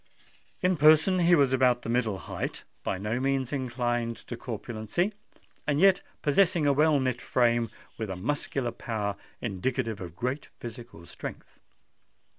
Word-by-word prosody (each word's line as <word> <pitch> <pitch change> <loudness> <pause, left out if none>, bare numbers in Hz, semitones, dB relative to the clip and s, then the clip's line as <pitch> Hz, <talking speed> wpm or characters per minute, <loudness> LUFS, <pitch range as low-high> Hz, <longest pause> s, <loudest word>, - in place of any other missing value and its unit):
In 180 -1 +3
person 155 +5 +6
he 175 0 +6
was 140 -4 +3
about 125 -2 +3
the - - -6
middle 115 -4 +1
height—by 95 - -5
no 105 +5 -2
means 135 0 0
inclined 120 -3 -1
to 120 - -8
corpulency—and 135 - -4
yet 195 +1 +6 0.2
possessing 170 +1 +3
a 140 - +4
well 150 +1 +4
knit 130 -2 -1
frame, 120 -2 +2 0.3
with 110 -2 -3
a 95 - -3
muscular 130 - -1
power 105 -4 -3 0.3
indicative 115 +1 -2
of 85 -2 -7
great 130 +7 -3
physical 115 -7 -9
strength. - - -9
125 Hz, 135 wpm, -28 LUFS, 115-145 Hz, 0.3 s, person